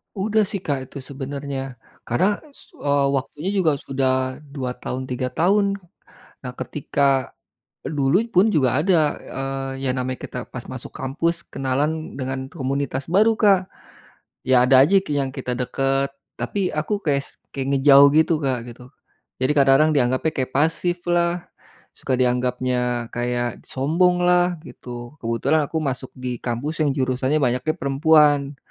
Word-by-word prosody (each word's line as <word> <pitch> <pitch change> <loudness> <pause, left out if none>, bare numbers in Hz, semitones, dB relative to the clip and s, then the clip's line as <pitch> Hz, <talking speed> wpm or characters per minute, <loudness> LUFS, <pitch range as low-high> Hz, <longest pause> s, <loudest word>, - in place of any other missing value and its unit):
Udah 210 +1 +1
sih 200 -2 -4
Kak, 135 -3 -2
itu 140 0 -9
sebenarnya 135 -1 -5 0.3
karena, 190 - +1 0.2
su - - -13
eee, 140 -1 +2
waktunya 145 +6 -2
juga 180 -7 +2
sudah 130 -1 -1 0.2
2 130 -3 -2
tahun 130 +1 -4
3 125 0 -1
tahun, 200 +8 +2 0.6
nah 125 -1 -8
ketika, 140 -2 0 0.5
dulu 145 +6 +2
pun 185 +4 +5
juga 130 -3 +3
ada, 160 -3 +2
eee, 135 0 -5
yang 130 - 0
namanya 130 0 -3
kita - - -6
pas - - -8
masuk - - -8
kampus 165 +6 -2
kenalan 145 +4 -2
dengan 130 0 -3
komunitas 140 -1 -3
baru 215 +4 +4
Kak, 195 -4 +3 0.8
ya 130 -1 +5
ada 130 0 +6
aja 195 +5 +5
yang 140 -2 0
kita 125 -2 -3
dekat 135 +2 0 0.3
tapi 195 -3 -1
aku 200 +7 -2
kayak 140 -3 +1
s - - -9 0.3
kayak 135 0 -1
ngejauh 140 +1 +7
gitu 160 +2 +4
Kak, 125 -4 -1
gitu, 125 +1 -13 0.6
jadi 130 +3 +3
kadang-kadang 140 +3 +5
dianggapnya 130 +4 +2
kayak 130 -1 -2
pasif 165 +4 +1
lah, 175 0 +1 0.5
suka 130 - -3
dianggapnya 125 -1 0
kayak 120 -1 -2
sombong 175 +7 +2
lah 180 0 +3
gitu 120 0 -9
kebetulan 115 +7 +1
aku 160 - -2
masuk 130 -2 -3
di 125 -1 -4
kampus 140 +7 -3
yang 150 - +3
jurusannya 130 +2 0
banyaknya 130 +4 0
perempuan, 145 0 +3
140 Hz, 145 wpm, -22 LUFS, 130-160 Hz, 0.8 s, ngejauh